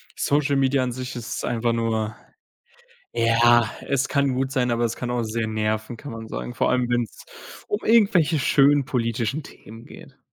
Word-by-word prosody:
Social 145 Hz, 0 st, +1 dB
Media 135 Hz, 0 st, +2 dB
an 125 Hz, -, -2 dB
sich 125 Hz, +1 st, -6 dB
ist 120 Hz, -2 st, -5 dB
einfach 115 Hz, 0 st, 0 dB
nur 110 Hz, -1 st, -1 dB, 1.0 s
ja, 115 Hz, 0 st, +4 dB, 0.2 s
es 140 Hz, 0 st, +1 dB
kann 140 Hz, -2 st, +1 dB
gut 135 Hz, +1 st, -1 dB
sein, 125 Hz, -3 st, 0 dB
aber 120 Hz, 0 st, 0 dB
es 115 Hz, -, -2 dB
kann 125 Hz, -, -5 dB
auch 120 Hz, -1 st, -1 dB
sehr 110 Hz, 0 st, -2 dB
nerven, 110 Hz, +2 st, -2 dB
kann 145 Hz, +3 st, -9 dB
man 115 Hz, -1 st, -8 dB
sagen, 120 Hz, -, -6 dB
vor -, -, +1 dB
allem 125 Hz, -1 st, +1 dB
wenn's 120 Hz, -3 st, -2 dB, 0.4 s
um 205 Hz, -, -1 dB
irgendwelche 200 Hz, -8 st, +4 dB
schönen 140 Hz, +1 st, +4 dB
politischen 120 Hz, +1 st, -1 dB
Themen 115 Hz, -4 st, -13 dB
geht. -, -, -14 dB
120 Hz, 175 wpm, -23 LUFS, 115-140 Hz, 1.0 s, ja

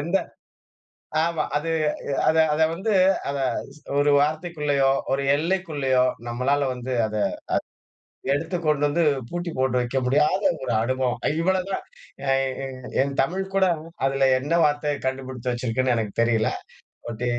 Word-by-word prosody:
எந்த 170 Hz, +6 st, +1 dB, 1.1 s
ஆமா 165 Hz, -2 st, 0 dB
அது 165 Hz, +2 st, -1 dB, 0.6 s
அத, 160 Hz, -, +4 dB, 0.2 s
அத 155 Hz, -, 0 dB
வந்து 195 Hz, +6 st, -2 dB, 0.4 s
அத 140 Hz, -, -2 dB, 0.4 s
ஸ் 150 Hz, -, -18 dB, 0.2 s
ஒரு 145 Hz, +1 st, +4 dB
வார்த்தைக்குள்ளயோ, 150 Hz, -2 st, +1 dB, 0.2 s
ஒரு 140 Hz, +1 st, +1 dB
எல்லைக்குள்ளயோ 150 Hz, -6 st, +1 dB, 0.2 s
நம்மளால 135 Hz, +4 st, +1 dB
வந்து 125 Hz, +1 st, -5 dB
அதை 105 Hz, -1 st, -2 dB, 1.1 s
எடுத்து 175 Hz, +5 st, -1 dB
கொண்டு 150 Hz, -1 st, +2 dB
வந்து 165 Hz, +3 st, +1 dB, 0.3 s
பூட்டி 175 Hz, -1 st, -4 dB
போட்டு 130 Hz, -1 st, +1 dB
வைக்க 120 Hz, +2 st, -2 dB
முடியாத 150 Hz, +9 st, +2 dB, 0.2 s
ஒரு 120 Hz, -, -1 dB
அனுபவம். 130 Hz, 0 st, 0 dB, 0.2 s
இவ்ளோதான் 190 Hz, +2 st, 0 dB, 0.5 s
என், 135 Hz, 0 st, +1 dB
என், 130 Hz, -1 st, -8 dB
என் 140 Hz, 0 st, -1 dB
தமிழ் 190 Hz, +7 st, -2 dB
கூட. 190 Hz, -1 st, +4 dB, 0.4 s
அதுல 135 Hz, 0 st, +2 dB
என்ன 145 Hz, +5 st, -2 dB
வார்த்தைய 145 Hz, 0 st, 0 dB
கண்டுபிடிச்சு 130 Hz, -2 st, -3 dB
வச்சிருக்குன்னு, 125 Hz, +1 st, 0 dB
எனக்கு 110 Hz, -3 st, -2 dB
தெரியல. 115 Hz, -2 st, +2 dB, 0.6 s
பட் 120 Hz, +1 st, -4 dB
140 Hz, 130 wpm, -24 LUFS, 130-160 Hz, 1.1 s, அத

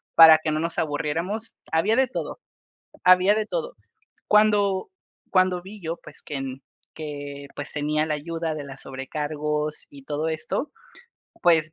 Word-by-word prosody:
para 160 Hz, -1 st, +10 dB
que 155 Hz, -, 0 dB
no 155 Hz, -, 0 dB
nos 165 Hz, +1 st, -2 dB
aburriéramos. 165 Hz, +9 st, -2 dB, 0.2 s
Había 180 Hz, +8 st, +3 dB
de 265 Hz, +1 st, +4 dB
todo, 255 Hz, -, -5 dB, 0.7 s
había 185 Hz, +2 st, +7 dB
de 215 Hz, 0 st, 0 dB
todo. -, -, -3 dB, 0.5 s
Cuando 205 Hz, -2 st, +4 dB, 0.4 s
cuando 185 Hz, -1 st, +3 dB
vi 200 Hz, +2 st, -10 dB
yo, 165 Hz, +1 st, -3 dB
pues, 150 Hz, -, -12 dB
que 140 Hz, -2 st, -4 dB, 0.5 s
que, 145 Hz, -2 st, -6 dB
pues, -, -, -5 dB
que 150 Hz, -, -5 dB
tenía 150 Hz, +1 st, +1 dB
la 155 Hz, -, 0 dB
ayuda 165 Hz, +1 st, -3 dB
de 145 Hz, -, -5 dB
la 135 Hz, -1 st, -8 dB
sobrecargos 150 Hz, +3 st, -3 dB
y 140 Hz, -, -13 dB
todo 150 Hz, +3 st, -2 dB
esto, 160 Hz, -, -2 dB, 0.7 s
pues, 160 Hz, -2 st, +4 dB
160 Hz, 155 wpm, -25 LUFS, 150-190 Hz, 0.7 s, para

